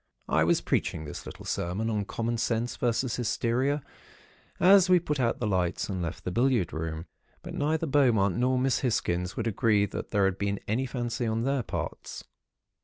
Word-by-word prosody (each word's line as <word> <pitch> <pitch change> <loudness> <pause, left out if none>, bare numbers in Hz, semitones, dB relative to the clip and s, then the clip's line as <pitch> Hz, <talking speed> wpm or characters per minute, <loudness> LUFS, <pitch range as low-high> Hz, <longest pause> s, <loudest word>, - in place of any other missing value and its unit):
"I - - +3
was - - +2
preaching 80 - -1
this 75 - -8
little - - -9
sermon 95 +6 -2
on 105 -3 -1
common 115 +3 -2
sense, 115 +1 -1
versus 120 -1 0
hysteria, 125 +4 0 0.8
as 190 +1 +6
we 180 -1 +6
put 150 -4 -3
out 120 -2 +1
the 120 - -1
lights 95 -3 0
and 95 -2 -2
left 85 +1 -4
the 90 - -3
billiard 120 -4 +1
room. 80 +1 -4 0.4
But - - -7
neither 155 +3 0
Beaumont 120 - +3
nor 130 +1 +2
Miss 130 0 +1
Hisgins 90 -8 -1
would 115 - -1
agree 105 -2 +2
that 100 - -6
there 100 -2 +2
had 95 0 0
been 100 0 -1
any 125 +6 0
fancy 120 -1 -2
on 110 +1 0
their 135 0 +1
parts. 115 - -5
115 Hz, 180 wpm, -28 LUFS, 100-130 Hz, 0.8 s, as